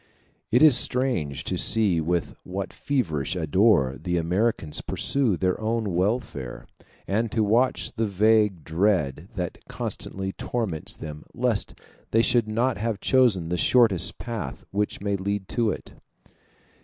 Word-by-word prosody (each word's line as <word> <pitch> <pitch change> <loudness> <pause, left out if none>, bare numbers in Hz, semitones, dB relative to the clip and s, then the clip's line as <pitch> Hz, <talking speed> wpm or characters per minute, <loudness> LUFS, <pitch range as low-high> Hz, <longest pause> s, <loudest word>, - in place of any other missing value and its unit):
It 125 +6 +4
is 150 -5 +8
strange 115 - +1
to 90 - -2
see 100 -7 +3
with 85 +1 -1
what 95 +1 -5
feverish 90 - -1
ardor 80 - +2
the 90 +1 -1
Americans 85 -1 0
pursue 130 -10 0
their 90 +4 0
own 110 -3 -1
welfare; 90 - -2 0.4
and 110 +3 0
to 110 - +1
watch 115 +5 +1
the 115 -2 0
vague 105 -3 +2
dread 85 -2 0
that 90 -3 -4
constantly 95 0 -5
torments 110 -10 -4
them 75 -1 -8
lest - - -1 0.3
they 115 +1 +3
should 120 -3 +2
not 115 +4 0
have 110 -1 -2
chosen 110 -12 +3
the 90 - -1
shortest 100 -1 +3
path 115 -3 -6
which 105 0 -2
may 100 0 0
lead 100 0 -3
to 115 -3 +1
it. - - -6
100 Hz, 140 wpm, -25 LUFS, 85-115 Hz, 0.4 s, is